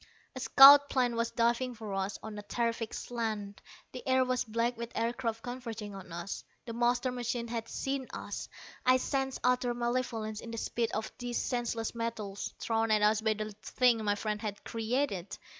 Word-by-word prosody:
A - - -4
scout 280 +2 +9
plane 245 -3 +1
was 230 0 0
diving 240 +2 +1
for 215 -3 -6
us, 195 +1 -2
on 220 -1 -6
a - - -5
terrific 230 +1 -2
slant. 215 -4 -4 0.3
The 255 - -7
air 260 0 +4
was 255 0 0
black 230 +1 0
with 235 0 -6
aircraft 230 -1 -1
converging 230 -4 -6
on 190 -3 -10
us. 175 +3 -5 0.2
The 230 - -5
master 245 +2 +1
machine 240 -1 -2
had 230 -1 -4
seen 270 -1 -2
us! - - -6 0.3
I 255 0 +6
sensed 265 0 -2
utter 250 -1 +2
malevolence 235 -3 -2
in 230 - -8
the 230 - -5
speed 230 0 -1
of 215 +1 -3
these 245 -1 -2
senseless 235 -2 -2
metals, 225 -4 -4
thrown 225 0 0
at 215 -1 +3
us 210 +1 +4
by 220 -1 +2
the 215 0 -4
thing 240 +1 +2
my 205 -1 +2
friend 210 0 -3
had 205 -2 -5
created. 225 -4 -2
230 Hz, 180 wpm, -31 LUFS, 215-245 Hz, 0.3 s, scout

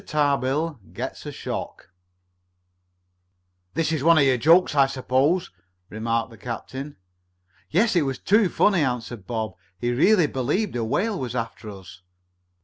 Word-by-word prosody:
TARBILL 145 0 0
GETS - - -6
A - - -4
SHOCK - - -6 1.8
"This 165 0 0
is 155 -4 -1
one 165 +1 +6
of 145 - +6
your 135 -2 +4
'jokes,' 165 +9 +4
I 140 -2 +4
suppose," 135 +6 0 0.4
remarked 115 +2 -2
the 115 - -14
captain. 130 +5 -6 0.7
"Yes. 200 +7 +2
It 175 - +4
was 135 -3 -2
too 210 -1 +3
funny," 195 -2 +3
answered 120 -6 -3
Bob. 110 -4 -3 0.2
"He 120 +4 -1
really 175 - +4
believed 145 - -1
a 120 - -1
whale 195 - -1
was 125 -2 -4
after 115 -2 -4
us." 95 -2 -12
135 Hz, 140 wpm, -24 LUFS, 115-165 Hz, 1.8 s, one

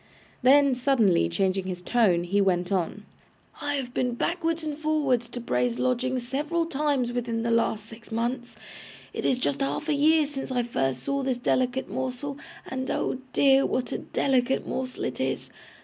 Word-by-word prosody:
Then, 275 +1 +6
suddenly 235 - +3
changing 190 - 0
his 180 -1 -4
tone, 180 -3 +2
he 200 +3 +1
went 180 -2 +1
on: 195 +2 -1 0.6
'I 290 0 -1
have 255 -3 -4
been 250 -1 0
backwards 330 +3 -1
and 305 -2 -3
forwards 290 -6 0
to 245 - -6
Bray's 240 0 0
lodgings 255 0 0
several 305 +6 0
times 280 -6 0
within 235 -2 -2
the 235 - 0
last 220 -2 +1
six 230 +1 -12
months. 240 +2 -2 0.6
It - - -4
is 260 - +3
just 145 - -1
half 140 +2 -1
a 310 - +2
year 305 +2 +4
since 275 -2 -5
I 250 -1 +1
first 135 - -1
saw 280 0 -1
this 260 -2 0
delicate 255 +1 0
morsel, 260 +2 -4 0.3
and, 260 0 -4
oh 260 - -1
dear, 275 -1 +5
what 250 - -1
a - - -2
delicate 265 -1 +1
morsel 255 -1 -4
it - - -3
is! - - -2
250 Hz, 175 wpm, -26 LUFS, 230-275 Hz, 0.6 s, Then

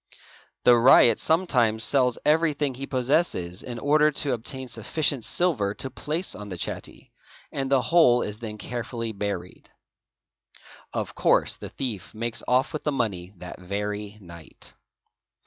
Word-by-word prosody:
The 120 - +7
ryot 115 -2 +6
sometimes 125 -10 +2
sells 125 0 +2
everything 150 -3 +2
he 135 +2 -6
possesses 125 - 0
in 120 -1 -7
order 150 +4 +4
to 145 -1 0
obtain 130 +3 -5
sufficient 125 +3 -1
silver 115 - 0
to 135 - -4
place 155 +7 -3
on 105 -1 -8
the 90 - -6
chatty, - - -6 0.4
and 135 -1 -3
the 135 -1 +3
whole 140 -8 +4
is 105 +1 -5
then 110 -2 -6
carefully 115 0 -4
buried. 100 -1 -5 1.2
Of - - -3
course - - +2
the - - -9
thief 115 -7 -6
makes 115 +1 -3
off 130 +5 +2
with 155 - -4
the 150 - 0
money 100 -8 -3
~ - - -26
that 90 +1 -9
very 105 +2 -4
night. 85 -4 -11
120 Hz, 145 wpm, -25 LUFS, 105-140 Hz, 1.2 s, The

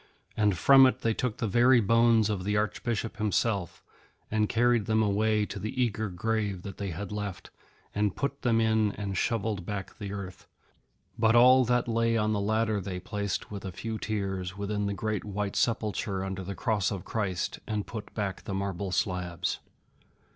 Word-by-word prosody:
And 105 -4 +2
from 135 +6 +7
it 130 +1 -1
they 115 -3 +1
took 120 -1 -2
the 115 - -1
very 120 +4 +5
bones 115 0 +4
of 100 -4 -2
the 105 +2 0
Archbishop 115 +2 -2
himself, 105 -3 -1 0.5
and 105 0 +1
carried 120 -2 +2
them 110 0 +3
away 105 +1 +2
to 105 - -6
the 110 +6 -4
eager 110 -3 0
grave 100 0 -2
that 100 -2 -7
they 100 -1 -3
had 90 +4 -5
left, 105 -3 -5 0.4
and 105 -2 0
put 140 0 -3
them 115 -2 +2
in 110 -2 +2
and 100 -2 -4
shovelled 105 -2 -1
back 100 +4 -6
the 100 -2 -5
earth. 95 -3 -7 0.7
But 110 +1 +4
all 130 +2 +7
that 125 +1 +1
lay 115 0 +2
on 110 0 +1
the 105 - 0
ladder 110 0 +1
they 90 -1 -4
placed, 100 +2 -3
with 100 -1 -6
a 95 - -5
few 110 +4 -5
tears, 95 -3 -3
within 100 0 -2
the 100 - -2
great 110 -1 -2
white 105 -1 -3
sepulchre 105 -4 0
under 95 0 -4
the 100 +2 -5
Cross 100 +2 0
of 100 -4 -5
Christ, 100 -6 -2
and 105 -2 -2
put 110 -3 -7
back 100 -3 -2
the 95 - -3
marble 95 -1 -3
slabs. 90 -2 -1
105 Hz, 185 wpm, -28 LUFS, 100-115 Hz, 0.7 s, from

